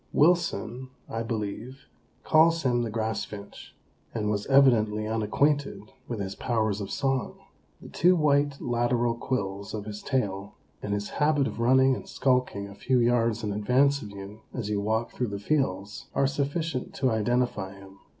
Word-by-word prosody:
Wilson, 140 Hz, -, +1 dB, 0.2 s
I 115 Hz, -, -3 dB
believe, 115 Hz, +3 st, -5 dB, 0.4 s
calls 165 Hz, +1 st, +4 dB
him 120 Hz, -2 st, +2 dB
the 115 Hz, -, -2 dB
Grass 110 Hz, 0 st, -2 dB
Finch, 100 Hz, -1 st, -10 dB, 0.4 s
and 105 Hz, -2 st, 0 dB
was 100 Hz, -1 st, -2 dB
evidently 115 Hz, -6 st, +4 dB
unacquainted 115 Hz, +7 st, 0 dB, 0.3 s
with 120 Hz, -3 st, -4 dB
his 95 Hz, -1 st, -3 dB
powers 110 Hz, -3 st, -1 dB
of 100 Hz, -, -5 dB
song. 135 Hz, -2 st, -1 dB, 0.5 s
The -, -, -10 dB
two 180 Hz, +1 st, +4 dB
white 145 Hz, -3 st, +2 dB
lateral 120 Hz, 0 st, +1 dB
quills 100 Hz, -5 st, -3 dB
of 105 Hz, -1 st, -5 dB
his 105 Hz, -1 st, -7 dB
tail, 100 Hz, -5 st, -2 dB, 0.3 s
and 105 Hz, 0 st, -2 dB
his 105 Hz, 0 st, -4 dB
habit 150 Hz, -2 st, +3 dB
of -, -, -5 dB
running 130 Hz, +2 st, +4 dB
and -, -, -9 dB
skulking 125 Hz, -6 st, 0 dB
a 100 Hz, -, -10 dB
few 130 Hz, +5 st, +1 dB
yards 115 Hz, -1 st, +2 dB
in 105 Hz, -1 st, -1 dB
advance 130 Hz, +7 st, +2 dB
of 105 Hz, -, -7 dB
you 100 Hz, +2 st, -10 dB
as 110 Hz, -5 st, -3 dB
you 100 Hz, -1 st, 0 dB
walk 110 Hz, +2 st, -1 dB
through 125 Hz, -, -2 dB
the 100 Hz, -1 st, -4 dB
fields, 100 Hz, -5 st, -2 dB
are 140 Hz, -, +3 dB
sufficient 140 Hz, +1 st, -2 dB
to 130 Hz, -3 st, +1 dB
identify 110 Hz, -3 st, 0 dB
him. 95 Hz, 0 st, -15 dB
115 Hz, 165 wpm, -27 LUFS, 105-135 Hz, 0.5 s, calls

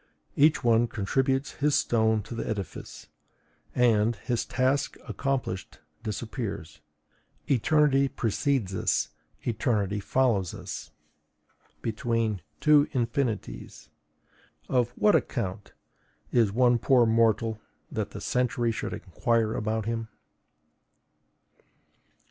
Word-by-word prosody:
Each 155 Hz, +1 st, +4 dB
one 120 Hz, 0 st, +4 dB
contributes 135 Hz, +6 st, 0 dB
his 145 Hz, 0 st, +1 dB
stone 110 Hz, -2 st, +2 dB
to 120 Hz, -, -8 dB
the 115 Hz, -, -4 dB
edifice; 100 Hz, -4 st, -6 dB, 0.7 s
and, 115 Hz, -2 st, +3 dB
his 120 Hz, +2 st, -2 dB
task 135 Hz, +2 st, 0 dB
accomplished, 135 Hz, -9 st, -3 dB, 0.2 s
disappears. 105 Hz, -, -5 dB, 0.7 s
Eternity 140 Hz, +1 st, +3 dB
precedes 120 Hz, -3 st, -1 dB
us, 95 Hz, -, 0 dB, 0.3 s
eternity 105 Hz, -3 st, 0 dB
follows 105 Hz, -6 st, +1 dB
us: -, -, -7 dB, 0.9 s
between 115 Hz, -3 st, -1 dB, 0.2 s
two 150 Hz, -1 st, +5 dB
infinites, 120 Hz, -1 st, -2 dB, 0.8 s
of 125 Hz, -2 st, +2 dB
what 210 Hz, -, +4 dB
account 100 Hz, -4 st, -1 dB, 0.6 s
is 115 Hz, -5 st, +3 dB
one 120 Hz, +2 st, +3 dB
poor 125 Hz, 0 st, +4 dB
mortal 110 Hz, -1 st, +2 dB, 0.3 s
that -, -, -2 dB
the -, -, -8 dB
century 125 Hz, -1 st, 0 dB
should 110 Hz, -, -4 dB
inquire 115 Hz, -2 st, 0 dB
about 110 Hz, 0 st, -1 dB
him? 115 Hz, 0 st, -2 dB
115 Hz, 95 wpm, -27 LUFS, 110-130 Hz, 0.9 s, two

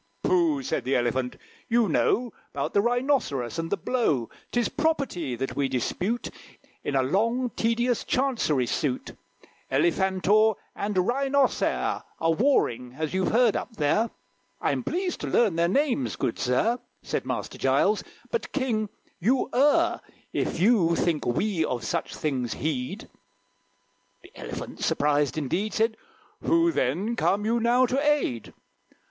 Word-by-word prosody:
"Pooh!" 325 Hz, -6 st, +2 dB
said 260 Hz, -, -2 dB
the 135 Hz, -, 0 dB
Elephant; 125 Hz, +1 st, 0 dB, 0.3 s
"you 230 Hz, -1 st, +3 dB
know 235 Hz, +8 st, +1 dB, 0.2 s
'Bout -, -, -2 dB
the 200 Hz, -, +4 dB
Rhinoceros, 235 Hz, -, 0 dB
and 165 Hz, 0 st, -3 dB
the 200 Hz, -, +1 dB
blow; 160 Hz, -, 0 dB, 0.2 s
'Tis 240 Hz, -1 st, +1 dB
property 275 Hz, -, -1 dB
that 135 Hz, +2 st, -4 dB
we 140 Hz, -1 st, +1 dB
dispute. 180 Hz, -, -2 dB, 0.5 s
In 140 Hz, -, -2 dB
a 135 Hz, -, +3 dB
long, 230 Hz, -, +1 dB
tedious 235 Hz, +1 st, 0 dB
Chancery 235 Hz, -, +1 dB
suit 130 Hz, +1 st, -2 dB, 0.6 s
Elephantor 190 Hz, +4 st, +3 dB, 0.2 s
and 205 Hz, 0 st, -3 dB
Rhinocere 270 Hz, +8 st, +1 dB, 0.2 s
Are 165 Hz, 0 st, +2 dB
warring, 125 Hz, -, +1 dB
as 155 Hz, +1 st, -2 dB
you've 190 Hz, 0 st, +1 dB
heard 235 Hz, -1 st, +4 dB
up 230 Hz, -, -4 dB
there." 210 Hz, +9 st, +2 dB, 0.5 s
"I'm -, -, 0 dB
pleased 360 Hz, +1 st, -2 dB
to -, -, -3 dB
learn 215 Hz, -8 st, +3 dB
their 170 Hz, +1 st, +2 dB
names, 215 Hz, -, +1 dB
good 115 Hz, -, -2 dB
sir," 215 Hz, -, +1 dB, 0.2 s
Said -, -, -2 dB
Master -, -, -4 dB
Giles; -, -, +2 dB, 0.3 s
"but, 470 Hz, -, -2 dB
King, 230 Hz, -6 st, -1 dB, 0.3 s
you 250 Hz, +8 st, +1 dB
err 295 Hz, +7 st, +3 dB, 0.3 s
If -, -, -1 dB
you 180 Hz, -4 st, +4 dB
think 165 Hz, -4 st, 0 dB
we 170 Hz, -, +1 dB
of 125 Hz, -5 st, -2 dB
such 170 Hz, -, -2 dB
things 130 Hz, -6 st, -2 dB
heed." 130 Hz, -3 st, -3 dB, 1.2 s
The -, -, -16 dB
Elephant, -, -, -7 dB
surprised 145 Hz, 0 st, +1 dB
indeed, 175 Hz, +9 st, -1 dB
Said, 220 Hz, 0 st, +2 dB, 0.5 s
"Who, 335 Hz, 0 st, +3 dB
then, 190 Hz, -, 0 dB
come 205 Hz, -2 st, +1 dB
you 230 Hz, +2 st, +2 dB
now 240 Hz, +2 st, +4 dB
to 260 Hz, +3 st, 0 dB
aid?" 295 Hz, -, 0 dB
210 Hz, 140 wpm, -26 LUFS, 150-250 Hz, 1.2 s, the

